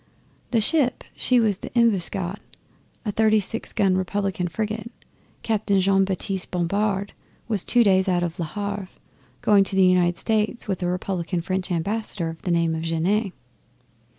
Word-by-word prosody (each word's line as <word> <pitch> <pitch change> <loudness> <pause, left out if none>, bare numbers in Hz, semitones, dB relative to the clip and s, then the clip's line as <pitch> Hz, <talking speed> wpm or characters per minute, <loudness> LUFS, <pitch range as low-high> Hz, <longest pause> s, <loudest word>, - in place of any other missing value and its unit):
The 230 -3 +2
ship 275 +1 +2
she 250 -1 +3
was 215 -4 +2
the - - -8
Embuscade, 195 -4 +1 0.7
a 210 - 0
thirty 215 +1 +3
six 215 +3 -4
gun 195 -3 +2
Republican 185 -1 -1
frigate, 215 +5 -3 0.5
Captain 210 -3 +1
Jean 195 +1 +3
Baptiste 190 0 -3
Bompard, 200 +3 -1 0.5
two 240 -1 +5
days 190 -2 +3
out 175 -1 +1
of 175 0 -4
Le 170 - -1
Havre, 200 +3 -4 0.6
going 205 -2 +5
to 195 - -5
the 190 -1 +5
United 180 -1 +3
States 220 +1 -1
with 195 -2 -2
a 175 - 0
Republican 180 -1 -2
French 185 +1 -2
Ambassador 180 0 -2
of 165 0 -9
the - - -4
name 170 -1 +2
of 160 - -3
Genet. 180 +6 0
195 Hz, 155 wpm, -24 LUFS, 180-215 Hz, 0.7 s, two